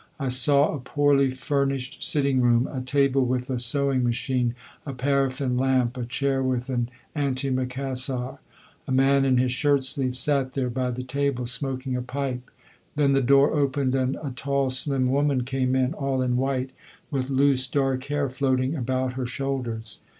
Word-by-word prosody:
I 135 Hz, -2 st, -1 dB
saw 140 Hz, +4 st, +3 dB
a 150 Hz, -, -4 dB
poorly 140 Hz, +1 st, +2 dB
furnished 135 Hz, 0 st, -2 dB
sitting 140 Hz, -3 st, +3 dB
room 120 Hz, +1 st, +3 dB
a 130 Hz, -, -3 dB
table 135 Hz, 0 st, +2 dB
with 125 Hz, +1 st, -2 dB
a 125 Hz, -, -1 dB
sewing 135 Hz, +1 st, +1 dB
machine, 120 Hz, 0 st, 0 dB, 0.3 s
a 140 Hz, -, -6 dB
paraffin 135 Hz, -1 st, 0 dB
lamp, 130 Hz, -2 st, +1 dB
a 125 Hz, -2 st, -4 dB
chair 135 Hz, +2 st, 0 dB
with 130 Hz, -1 st, -1 dB
an 120 Hz, -1 st, -1 dB, 0.3 s
antimacassar. 130 Hz, -1 st, -1 dB, 0.5 s
A -, -, -4 dB
man 135 Hz, +1 st, +3 dB
in 130 Hz, -2 st, +3 dB
his 125 Hz, 0 st, +2 dB
shirt 140 Hz, +1 st, +2 dB
sleeves 130 Hz, -2 st, +1 dB
sat 135 Hz, -1 st, 0 dB
there 130 Hz, -3 st, -1 dB
by 125 Hz, +1 st, -1 dB
the 125 Hz, +1 st, -4 dB
table, 135 Hz, -1 st, -1 dB
smoking 130 Hz, +1 st, -2 dB
a 125 Hz, -, -2 dB
pipe. 125 Hz, 0 st, -4 dB, 0.5 s
Then 145 Hz, -2 st, +3 dB
the 135 Hz, -, +3 dB
door 140 Hz, +2 st, +4 dB
opened 140 Hz, -3 st, 0 dB
and 130 Hz, 0 st, 0 dB
a 140 Hz, -, -3 dB
tall, 135 Hz, +1 st, -1 dB
slim 130 Hz, 0 st, +1 dB
woman 140 Hz, -2 st, +1 dB
came 130 Hz, 0 st, -1 dB
in, 130 Hz, +2 st, +1 dB
all 135 Hz, -4 st, -1 dB
in 125 Hz, -1 st, 0 dB
white, 130 Hz, 0 st, -1 dB, 0.4 s
with 135 Hz, -2 st, -2 dB
loose 135 Hz, -1 st, +2 dB
dark 135 Hz, -2 st, -1 dB
hair 145 Hz, -1 st, -1 dB
floating 130 Hz, +1 st, 0 dB
about 130 Hz, -1 st, -1 dB
her 130 Hz, -1 st, -3 dB
shoulders. 125 Hz, -5 st, -4 dB
130 Hz, 170 wpm, -25 LUFS, 125-140 Hz, 0.5 s, door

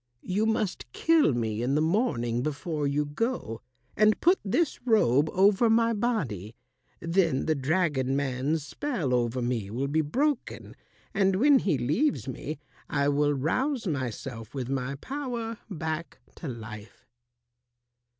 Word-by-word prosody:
You 205 Hz, +4 st, 0 dB
must 215 Hz, -, -1 dB
kill 325 Hz, -, +4 dB
me 110 Hz, -2 st, -1 dB
in 130 Hz, +3 st, +1 dB
the -, -, +3 dB
morning 155 Hz, -, +1 dB
before 150 Hz, +1 st, -2 dB
you 145 Hz, +1 st, 0 dB
go, 145 Hz, -, -3 dB, 0.3 s
and 215 Hz, 0 st, +4 dB
put 360 Hz, +3 st, +4 dB
this 285 Hz, -, 0 dB
robe 155 Hz, -, +3 dB
over 200 Hz, +4 st, +4 dB
my 230 Hz, +1 st, +3 dB
body. 140 Hz, -, -2 dB, 0.4 s
Then 165 Hz, -5 st, +1 dB
the 160 Hz, -, +2 dB
dragon 140 Hz, -2 st, 0 dB
man's 140 Hz, +2 st, -1 dB
spell 185 Hz, -, -2 dB
over 120 Hz, 0 st, 0 dB
me 120 Hz, -5 st, -2 dB
will 125 Hz, +6 st, -2 dB
be 155 Hz, +2 st, +2 dB
broken, 265 Hz, -, -2 dB, 0.4 s
and 195 Hz, -1 st, +2 dB
when 275 Hz, +6 st, +5 dB
he 175 Hz, -, +1 dB
leaves 150 Hz, -, 0 dB
me, 140 Hz, +3 st, -5 dB, 0.3 s
I 140 Hz, -1 st, +1 dB
will 145 Hz, 0 st, +2 dB
rouse 245 Hz, -, 0 dB
myself 130 Hz, -, -4 dB
with 130 Hz, -2 st, -3 dB
my 135 Hz, 0 st, -2 dB
power 235 Hz, -, -4 dB
back 160 Hz, -2 st, -4 dB, 0.2 s
to 165 Hz, -, -6 dB
life." 110 Hz, -3 st, -9 dB
155 Hz, 140 wpm, -28 LUFS, 130-220 Hz, 0.4 s, when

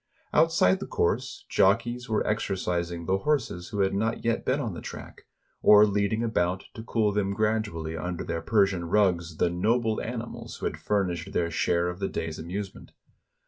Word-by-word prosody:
Outside 160 Hz, -, +4 dB
the -, -, -6 dB
course, -, -, -1 dB
jockeys 120 Hz, +5 st, +2 dB
were 110 Hz, -, +1 dB
exercising 90 Hz, -5 st, -2 dB
the 95 Hz, +2 st, +1 dB
horses 110 Hz, -, -1 dB
who 105 Hz, -2 st, -1 dB
had 95 Hz, 0 st, +2 dB
not 110 Hz, +4 st, -1 dB
yet 115 Hz, 0 st, +1 dB
been 130 Hz, +3 st, +1 dB
on 115 Hz, -8 st, -3 dB
the -, -, -7 dB
track; -, -, -10 dB, 0.3 s
or 105 Hz, 0 st, +8 dB
leading 105 Hz, +2 st, 0 dB
about, 95 Hz, -5 st, 0 dB
to 110 Hz, -, -8 dB
cool 110 Hz, -2 st, +1 dB
them 100 Hz, -1 st, 0 dB
gradually 105 Hz, -7 st, -1 dB
under 90 Hz, +2 st, -4 dB
their 85 Hz, -1 st, -3 dB
Persian 95 Hz, -3 st, +2 dB
rugs, 85 Hz, -3 st, +1 dB
the 85 Hz, -, +2 dB
noble 110 Hz, +5 st, +1 dB
animals 120 Hz, 0 st, -6 dB
who -, -, -5 dB
had -, -, -2 dB
furnished 95 Hz, -4 st, -1 dB
their 85 Hz, -1 st, 0 dB
share 85 Hz, +1 st, +1 dB
of 90 Hz, +1 st, -4 dB
the 95 Hz, -, -1 dB
day's 80 Hz, -1 st, -4 dB
amusement. 95 Hz, +5 st, -6 dB
100 Hz, 175 wpm, -27 LUFS, 85-110 Hz, 0.3 s, or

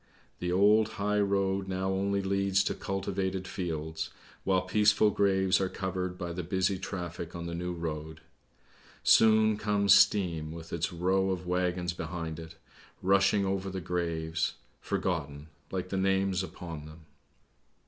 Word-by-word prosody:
The 90 Hz, -, -2 dB
old 105 Hz, +4 st, +4 dB
high 105 Hz, +1 st, 0 dB
road 100 Hz, -1 st, +1 dB
now 95 Hz, 0 st, -1 dB
only 100 Hz, +1 st, 0 dB
leads 100 Hz, 0 st, +2 dB
to -, -, -1 dB
cultivated 95 Hz, -1 st, -3 dB
fields, 80 Hz, -2 st, -4 dB, 0.3 s
while 95 Hz, -1 st, +2 dB
peaceful 105 Hz, +2 st, +4 dB
graves 95 Hz, -2 st, +2 dB
are 95 Hz, -, 0 dB
covered 90 Hz, -1 st, -3 dB
by 85 Hz, -2 st, -4 dB
the 90 Hz, -, -3 dB
busy 95 Hz, +2 st, 0 dB
traffic 90 Hz, -3 st, -5 dB
on 85 Hz, 0 st, -5 dB
the 85 Hz, -, -4 dB
new 90 Hz, +1 st, -3 dB
road. 80 Hz, -2 st, -5 dB, 0.8 s
Soon 110 Hz, -1 st, +5 dB
comes 105 Hz, -1 st, +3 dB
Steam 85 Hz, -6 st, +3 dB
with 80 Hz, 0 st, -9 dB
its 85 Hz, 0 st, -1 dB
row 95 Hz, +2 st, +1 dB
of 90 Hz, -1 st, -2 dB
waggons 90 Hz, -1 st, 0 dB
behind 80 Hz, -1 st, -5 dB
it, 80 Hz, 0 st, -10 dB, 0.5 s
rushing 100 Hz, +1 st, +3 dB
over 95 Hz, 0 st, -1 dB
the 95 Hz, 0 st, -4 dB
graves, 85 Hz, -2 st, -2 dB, 0.2 s
forgotten, 75 Hz, -4 st, -3 dB, 0.2 s
like 90 Hz, -1 st, -3 dB
the 95 Hz, -, -2 dB
names 95 Hz, 0 st, +1 dB
upon 85 Hz, -5 st, -7 dB
them. 80 Hz, +1 st, -13 dB
95 Hz, 145 wpm, -30 LUFS, 85-95 Hz, 0.8 s, Soon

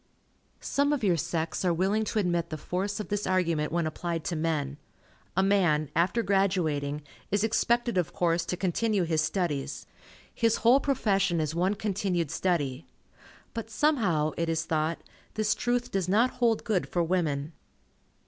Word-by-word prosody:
Some 285 Hz, +1 st, +1 dB
of 280 Hz, -, -2 dB
your 185 Hz, -4 st, +3 dB
sex 165 Hz, +2 st, -2 dB
are 180 Hz, -, +3 dB
willing 195 Hz, +6 st, +1 dB
to 220 Hz, -, -3 dB
admit 175 Hz, -4 st, 0 dB
the 155 Hz, -, -4 dB
force 190 Hz, +7 st, -3 dB
of 210 Hz, -, -5 dB
this 205 Hz, 0 st, -1 dB
argument 170 Hz, -5 st, +1 dB
when 170 Hz, 0 st, 0 dB
applied 165 Hz, +1 st, -3 dB
to 170 Hz, -, -2 dB
men. 155 Hz, -3 st, -1 dB, 0.6 s
A 190 Hz, -, +4 dB
man, 175 Hz, -7 st, +2 dB
after 185 Hz, +8 st, +2 dB
graduating, 160 Hz, -8 st, 0 dB, 0.3 s
is 205 Hz, +1 st, +1 dB
expected 235 Hz, -1 st, +1 dB
of 175 Hz, -, -1 dB
course 170 Hz, -1 st, +1 dB
to 180 Hz, -, -2 dB
continue 195 Hz, +2 st, +1 dB
his 160 Hz, -2 st, +1 dB
studies. 155 Hz, -4 st, -2 dB, 0.5 s
His 230 Hz, -1 st, +2 dB
whole 250 Hz, +4 st, +7 dB
profession 195 Hz, -, +1 dB
is 155 Hz, -1 st, -1 dB
one 185 Hz, +4 st, +1 dB
continued 190 Hz, -6 st, -1 dB
study. 160 Hz, -6 st, -1 dB, 0.7 s
But 230 Hz, -1 st, -5 dB
somehow, 210 Hz, -, +2 dB
it 170 Hz, 0 st, 0 dB
is 165 Hz, 0 st, 0 dB
thought, 160 Hz, 0 st, 0 dB, 0.4 s
this 215 Hz, -1 st, +2 dB
truth 245 Hz, 0 st, -1 dB
does 190 Hz, -2 st, -1 dB
not 230 Hz, +6 st, +3 dB
hold 235 Hz, -3 st, +1 dB
good 205 Hz, -5 st, 0 dB
for 175 Hz, -, +1 dB
women. 160 Hz, -4 st, -1 dB
180 Hz, 160 wpm, -28 LUFS, 160-210 Hz, 0.7 s, whole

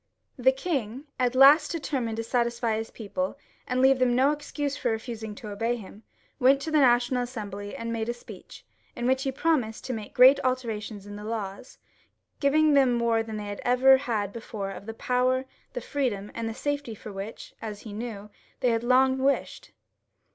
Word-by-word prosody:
The 260 Hz, +1 st, +4 dB
king, 265 Hz, -4 st, -3 dB, 0.2 s
at 250 Hz, 0 st, +1 dB
last 285 Hz, +3 st, +7 dB
determined 265 Hz, -9 st, -2 dB
to 230 Hz, -, -2 dB
satisfy 235 Hz, -1 st, 0 dB
his 225 Hz, +1 st, -4 dB
people, 260 Hz, +7 st, -4 dB, 0.3 s
and 255 Hz, 0 st, 0 dB
leave 265 Hz, 0 st, +5 dB
them 250 Hz, -1 st, +3 dB
no 265 Hz, +3 st, +4 dB
excuse 290 Hz, -1 st, -3 dB
for 245 Hz, -, -1 dB
refusing 220 Hz, -1 st, -4 dB
to 210 Hz, 0 st, -8 dB
obey 225 Hz, +4 st, -1 dB
him, 210 Hz, -2 st, -11 dB, 0.4 s
went 270 Hz, +1 st, +5 dB
to 320 Hz, -, -4 dB
the 310 Hz, -, +4 dB
National 245 Hz, -1 st, +3 dB
Assembly 205 Hz, -5 st, -6 dB
and 230 Hz, 0 st, -4 dB
made 225 Hz, 0 st, -2 dB
a -, -, 0 dB
speech, 240 Hz, -, -13 dB, 0.3 s
in 240 Hz, -, -3 dB
which 260 Hz, +1 st, +2 dB
he 270 Hz, -1 st, -1 dB
pro 330 Hz, +5 st, +1 dB
mised 220 Hz, -4 st, -5 dB
to 255 Hz, -, -3 dB
make 215 Hz, -3 st, -7 dB
great 260 Hz, +3 st, +8 dB
alterations 225 Hz, -5 st, -3 dB
in 205 Hz, 0 st, -8 dB
the 210 Hz, -, -8 dB
laws, 210 Hz, 0 st, -5 dB, 0.6 s
giving 305 Hz, +2 st, +4 dB
them 270 Hz, -3 st, +5 dB
more 235 Hz, -1 st, +2 dB
than 220 Hz, -1 st, -5 dB
they 210 Hz, -, -5 dB
had 205 Hz, 0 st, -6 dB
ever 260 Hz, +2 st, +6 dB
had 220 Hz, -7 st, -2 dB
before, 210 Hz, -4 st, -5 dB
of 200 Hz, +2 st, -9 dB
the 225 Hz, -, -6 dB
power, 255 Hz, +2 st, +1 dB, 0.3 s
the -, -, -4 dB
freedom, 230 Hz, -9 st, -2 dB
■ -, -, -14 dB
and 230 Hz, -1 st, -3 dB
the 225 Hz, -, -6 dB
safety, 285 Hz, -3 st, -3 dB
for 210 Hz, 0 st, -10 dB
which, 195 Hz, +3 st, -7 dB
as 210 Hz, -2 st, -6 dB
he 215 Hz, -, -9 dB
knew, 210 Hz, -2 st, -6 dB, 0.3 s
they 250 Hz, -, +3 dB
had 230 Hz, 0 st, 0 dB
long 260 Hz, +2 st, +4 dB
wished. 275 Hz, +1 st, -1 dB
240 Hz, 200 wpm, -27 LUFS, 220-265 Hz, 0.6 s, great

